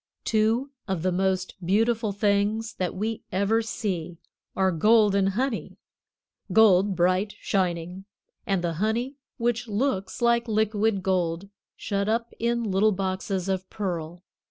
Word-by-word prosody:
Two 225 +5 +1 0.2
of 190 -5 -2
the 185 - +1
most 185 0 0
beautiful 220 +4 +1
things 205 +2 0
that 180 -1 -3
we 220 +3 -3
ever 200 +4 +2
see 185 -7 -4 0.4
are 190 -1 +2
gold 210 +4 +4
and 195 -1 +3
honey 240 +4 -2 0.7
gold, 200 -2 +5
bright 185 +4 +1
shining, 180 0 -2 0.4
and 195 -3 0
the 170 -1 -1
honey 240 +6 -1 0.2
which 240 0 -1
looks 205 -3 -1
like 235 0 +2
liquid 215 -2 +1
gold, 180 0 -1 0.3
shut 200 0 -2
up 230 +1 -1
in 235 +1 0
little 210 +1 +2
boxes 190 -1 -2
of 190 -1 -2
pearl. 175 -4 -4
200 Hz, 130 wpm, -26 LUFS, 185-225 Hz, 0.7 s, gold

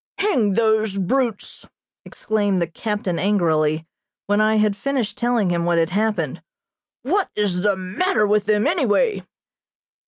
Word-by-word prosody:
"Hang 250 - +1
those 220 -2 +1
brutes!" 230 +3 -2 0.4
exclaimed 205 -3 -1
the 170 - +1
captain 190 +1 -3
angrily, 160 -6 +1 0.4
when 205 +1 +1
I 215 0 +3
had 210 -1 +2
finished 245 0 -2
telling 235 -6 0
him 170 -1 0
what 170 0 +1
had 165 +1 +1
happened. 200 -8 -1 0.6
"What 375 +9 0
is 195 -4 0
the 205 0 +2
matter 210 - 0
with 210 0 +1
them, 210 0 +2
any - - +1
way?" 485 -4 +1
210 Hz, 145 wpm, -21 LUFS, 185-220 Hz, 0.6 s, I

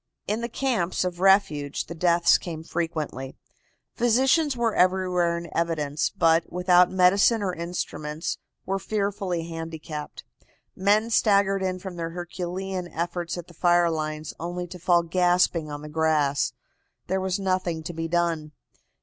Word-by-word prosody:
In 215 +3 -1
the 235 - -3
camps 230 -11 0
of 180 -1 -3
refuge 185 -7 +2
the 170 - -7
deaths 170 0 +4
came 160 -3 -6
frequently. 155 -6 -4 0.6
Physicians 260 +4 +2
were 230 -2 +1
everywhere 180 -2 +2
in 170 0 -6
evidence, 155 -3 0
but, 165 0 +2
without 180 0 +4
medicine 195 +4 +4
or 185 -2 -1
instruments, 165 -2 -4 0.3
were 195 +1 -1
fearfully 200 -5 -2
handicapped. 165 -2 -7 0.5
Men 210 +4 +2
staggered 200 -3 +3
in 185 -1 -1
from 185 -1 -8
their 165 -1 -3
herculean 180 +2 -4
efforts 175 +1 -3
at 175 - -6
the 175 - -15
fire 175 0 +3
lines, 155 -1 -4
only 175 +1 -4
to 180 - -9
fall 175 0 +3
gasping 175 -2 +2
on 145 0 -6
the - - -7
grass. 150 -2 +1 0.5
There 190 +1 -1
was 190 -1 -1
nothing 185 -4 -1
to 175 - -6
be 165 0 -3
done. 165 -3 -1
175 Hz, 145 wpm, -25 LUFS, 165-190 Hz, 0.6 s, deaths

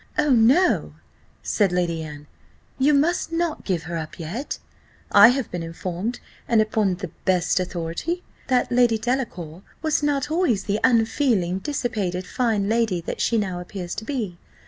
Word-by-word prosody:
"Oh, 300 -1 +3
no," 255 +10 +4 0.5
said 205 -4 +2
Lady 175 -2 0
Anne, 150 -2 -8 0.5
"you 275 +3 +4
must 325 +4 +2
not 330 -1 -1
give 175 -5 -1
her 170 +2 -5
up 160 -1 -6
yet, 185 - -4 0.5
I - - +9
have 250 0 0
been 175 - -3
informed, 180 +7 -4 0.3
and 230 -2 +3
upon 215 -3 +2
the 180 -3 -7
best 180 -1 +2
authority, 180 - -3 0.2
that 255 -1 +1
Lady 240 -2 +4
Delacour 215 - -3 0.2
was 315 -1 +1
not 290 -1 0
always 315 - +1
the 205 +1 -1
unfeeling, 225 -6 +2
dissipated 210 -9 -2
fine 225 -5 0
lady 220 -4 +1
that - - -5
she 230 - +2
now 190 -4 -1
appears 180 0 -6
to - - -5
be. 220 -10 -4
215 Hz, 155 wpm, -23 LUFS, 180-260 Hz, 0.5 s, I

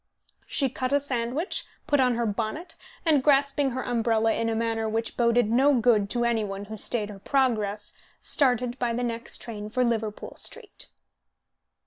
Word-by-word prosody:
She 275 - +1
cut 255 +1 -3
a 285 - +5
sandwich, 270 +4 -1 0.2
put 290 -2 +2
on 250 -2 +3
her 235 0 0
bonnet, 225 - -3 0.3
and, 305 -4 +4
grasping 280 0 +3
her 260 0 -3
umbrella 225 -2 +2
in 230 0 0
a 225 - 0
manner 225 -1 -1
which 225 +1 -2
boded 235 -2 +3
no 270 +4 +4
good 215 -4 +3
to 240 +1 0
any 230 -2 +1
one 195 0 -5
who 215 +2 -7
stayed 215 0 -2
her 200 - -10
progress, 215 -5 0 0.3
started 250 -3 +1
by 240 -2 0
the 245 +1 -1
next 235 -1 -3
train 210 -3 -6
for 250 +3 +1
Liverpool 220 -3 -2
Street. 460 -4 -4
235 Hz, 170 wpm, -26 LUFS, 220-260 Hz, 0.3 s, a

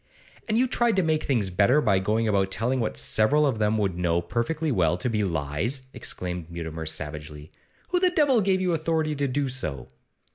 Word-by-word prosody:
'And 215 - +2
you 250 - +4
tried 240 -2 +1
to 190 - +2
make 155 -1 +1
things 115 -9 0
better 105 +10 +4
by 100 -9 +2
going 110 +4 0
about 100 -2 +1
telling 125 +6 -1
what 110 - -2
several 110 - +3
of 130 -6 0
them 105 +1 +1
would 95 -4 -1
know 85 -1 +1
perfectly 145 - -2
well 90 -6 +2
to 115 +7 -2
be 105 -2 0
lies?' 85 - -2
exclaimed 90 -2 -5
Mutimer, 80 -2 -6
savagely. 75 0 -6 0.4
'Who 360 - +2
the 365 0 +3
devil 290 - +3
gave 190 -1 +1
you 180 -2 +1
authority 160 -1 0
to 140 0 -1
do 140 +2 -1
so? 75 - -3
110 Hz, 195 wpm, -25 LUFS, -, 0.4 s, you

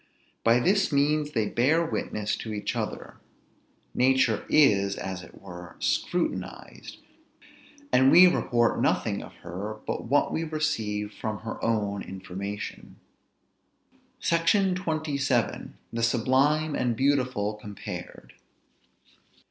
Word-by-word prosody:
By 115 +1 +5
this 190 +8 +2
means, 150 +1 +1
they 110 -2 +1
bear 155 +10 +2
witness 105 -9 -2
to 110 - -6
each 105 -1 -3
other; - - -5 0.8
nature 130 -3 +2
is, 100 -10 +4
as 95 -1 -5
it 80 - -14
were, 90 -2 -10
scrutinized; 175 -1 -3 1.0
and 130 +1 +6
we 180 +2 +9
report 120 -9 +2
nothing - - 0
of - - -12
her 100 +5 -5
but - - -3
what 140 +5 +2
we 165 - -1
receive 110 -10 -2
from 110 -1 -5
her 110 0 -6
own 105 -3 0
information. 95 +2 -7 1.2
SECTION 180 +3 +2
XXVII. 150 -8 -1 0.2
THE 115 - -2
SUBLIME 135 +6 +2
AND 120 -4 0
BEAUTIFUL 125 -6 0
COMPARED. 105 -2 -8
120 Hz, 110 wpm, -27 LUFS, 105-150 Hz, 1.2 s, we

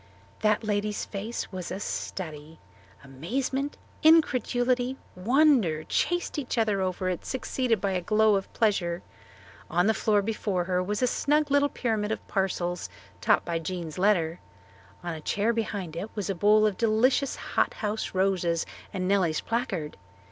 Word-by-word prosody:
That 215 +1 +2
lady's 210 0 -1
face 215 +4 -5
was 185 -2 -5
a 190 - -4
study. 160 -6 -5 0.5
Amazement, 255 - -3 0.2
incredulity, 255 -5 +3 0.2
wonder, 225 - +3
chased 350 - 0
each 255 -3 -4
other 215 -4 +2
over 185 0 -1
it, 180 -2 -2
succeeded 250 -3 -1
by 195 +1 -1
a 185 -1 0
glow 215 +4 +3
of 195 -1 -1
pleasure. 185 -6 0 0.7
On 175 - +2
the 220 - +4
floor 210 -2 +2
before 205 -4 -1
her 180 0 0
was 205 +6 -2
a - - +6
snug 295 +4 +1
little 285 0 +4
pyramid 220 -5 -1
of 220 - -4
parcels 180 - -1 0.3
topped - - +3
by 170 -1 -1
Jean's 170 -1 -5
letter. 180 -4 +2 0.6
On 175 -1 -3
a 160 - -7
chair 210 +8 +1
behind 200 -7 -3
it 195 +6 -4
was 205 -2 -2
a - - 0
bowl 210 +3 +4
of 210 -3 0
delicious 235 +5 +2
hot - - -1
house 210 -2 -3
roses 180 -3 +1 0.3
and 185 -2 -2
Nellie's 185 -5 +2
placard. 200 -10 -2
205 Hz, 155 wpm, -27 LUFS, 180-230 Hz, 0.7 s, a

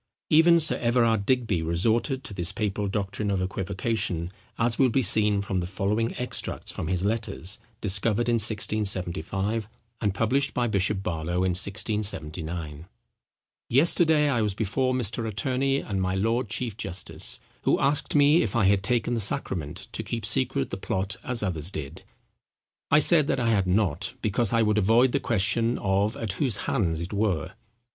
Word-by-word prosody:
Even 170 +2 +6
Sir 160 - +2
Everard 115 -4 +1
Digby 115 -9 +1
resorted 110 - 0
to - - -6
this 90 0 -2
papal 105 -1 -2
doctrine 100 +1 -3
of 100 -1 0
equivocation, 95 -1 -2 0.3
as 115 0 0
will 130 -2 +5
be 130 +3 +1
seen 105 -2 +4
from 95 -2 -2
the 85 - -3
following 105 +4 -1
extracts 125 - -4
from - - -5
his 90 +1 -1
letters 105 -3 -2 0.2
discovered 105 +3 +1
in 120 -1 +2
1675, 100 -1 -1 0.3
and 100 -3 0
published 135 +6 +1
by 125 - +1
Bishop 100 -2 0
Barlow, 85 +1 -2
in 95 -1 +1
1679:—"Yesterday 95 - -1
I 125 -5 +1
was 105 -3 -1
before 130 +5 0
Mr. 115 -2 -1
Attorney 130 +6 0
and 100 -2 -3
my 95 0 -1
Lord 115 +4 0
Chief 115 -2 -3
Justice, 95 -4 -3 0.2
who - - +2
asked 140 +2 0
me 145 +3 +5
if 105 - -2
I 115 -4 +3
had 100 0 +3
taken 120 +3 0
the 115 - 0
sacrament 90 -5 -1
to - - -4
keep 110 +1 -4
secret 130 +3 +2
the - - -3
plot 95 +1 -2
as 125 -4 -1
others 85 -4 -2
did. 75 -7 -7 0.9
I 145 - +5
said 155 -1 +5
that - - 0
I 120 -2 +1
had 100 -4 +1
not, 100 - 0
because 110 +1 +1
I 115 -1 +3
would 105 0 +2
avoid 115 +5 +4
the 140 - +1
question 115 +1 +1
of 100 +3 0
at 110 -4 -2
whose 125 -3 +1
hands 85 -10 0
it 85 +4 -6
were." 100 -7 -1
105 Hz, 165 wpm, -26 LUFS, 95-120 Hz, 0.9 s, Even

